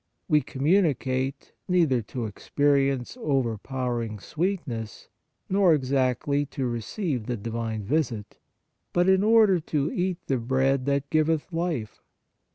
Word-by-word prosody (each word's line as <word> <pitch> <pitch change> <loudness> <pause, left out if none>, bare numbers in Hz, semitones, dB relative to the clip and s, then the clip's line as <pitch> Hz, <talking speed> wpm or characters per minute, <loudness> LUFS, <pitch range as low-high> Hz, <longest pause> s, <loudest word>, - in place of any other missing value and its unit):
We 150 -3 +4
communicate, 135 -3 0
neither 165 -9 +3
to 115 +2 -5
experience 135 - 0
overpowering 120 - -1
sweet 175 - -2
ness 115 -4 -6 0.4
nor 190 -4 +4
exactly 135 +1 +1
to 135 -1 -3
receive 120 - -3
the 120 -1 -2
Divine 110 0 -4
visit, 115 -4 -2 0.5
but 175 +1 +3
in 190 +1 +4
order 215 -4 +5
to 150 -2 -1
eat 180 -1 -1
the 135 -2 0
bread 130 +2 +1
that 140 0 0
giveth 155 +2 +1
life. 165 -10 -3
135 Hz, 120 wpm, -26 LUFS, 120-165 Hz, 0.5 s, order